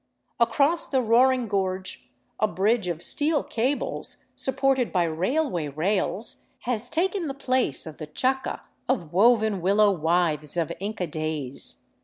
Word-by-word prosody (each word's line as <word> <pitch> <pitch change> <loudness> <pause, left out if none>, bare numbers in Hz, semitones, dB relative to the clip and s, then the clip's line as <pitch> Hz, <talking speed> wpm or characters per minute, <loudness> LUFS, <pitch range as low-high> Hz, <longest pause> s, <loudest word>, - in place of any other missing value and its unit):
Across 280 +8 +2
the 265 -2 +1
roaring 250 +2 +3
gorge 190 -2 -3 0.3
a 215 - +3
bridge 210 +1 +1
of 170 -1 -3
steel 295 - 0
cables, 255 +5 -2 0.2
supported 265 -1 +1
by 180 -2 +2
railway 175 - -1
rails, 190 +8 -1 0.2
has 240 -1 +1
taken 365 +2 0
the 270 - -4
place 255 - +1
of 160 -2 -9
the 155 - -6
chaca 260 - -1 0.3
of 175 - -1
woven 215 -1 +4
willow 200 +3 +4
withes 165 -2 +1
of 165 -3 0
Inca 200 -1 -3
days. 155 -4 -3
210 Hz, 135 wpm, -25 LUFS, 170-260 Hz, 0.3 s, woven